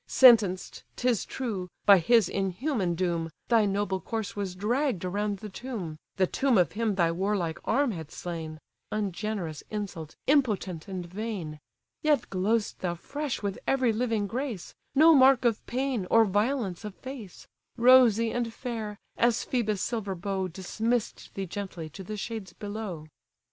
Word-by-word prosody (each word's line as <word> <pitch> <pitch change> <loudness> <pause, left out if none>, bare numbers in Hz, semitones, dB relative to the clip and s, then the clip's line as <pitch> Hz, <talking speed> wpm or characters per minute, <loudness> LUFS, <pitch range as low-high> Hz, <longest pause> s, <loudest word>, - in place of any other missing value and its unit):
Sentenced, 215 -8 +5
'tis 245 -4 +1
true, 205 -8 -4 0.2
by 200 -2 +8
his 225 +3 +4
inhuman 195 - -1
doom, 170 -2 -1 0.2
Thy 230 -3 +5
noble 195 -1 0
corse 220 -2 -4
was 195 -3 -3
dragg'd 225 - 0
around 205 +2 -1
the 210 - -8
tomb; 195 -8 -6 0.2
(The 190 - +3
tomb 260 +5 +2
of 175 -5 +3
him 220 -2 0
thy 170 -3 +3
warlike 180 -2 -1
arm 280 -3 +2
had 160 -6 -6
slain;) 160 -3 -6 0.3
Ungenerous 200 -5 -3
insult, 195 -7 -5
impotent 210 - +1
and 185 -2 -5
vain! 180 -5 -5 0.4
Yet 295 -5 +2
glow'st 205 +4 0
thou 175 -2 -2
fresh 285 - -4
with 200 -1 -2
every 260 -4 +3
living 225 -2 0
grace; 235 -2 -4 0.2
No 320 +4 +8
mark 265 -3 +6
of 230 -2 +2
pain, 250 -6 -1
or 225 0 +6
violence 205 -1 0
of 210 -2 -6
face: 255 -9 -9 0.3
Rosy 235 -2 +6
and 240 -1 -1
fair! 225 -4 -5 0.2
as 240 0 +2
Phœbus' 215 -5 0
silver 200 -1 -2
bow 190 +1 -2
Dismiss'd 220 +6 -2
thee 195 - -2
gently 185 -3 -6
to 190 - -8
the 215 +3 -6
shades 205 -4 -5
below." 205 -6 -6
205 Hz, 150 wpm, -28 LUFS, 185-235 Hz, 0.4 s, by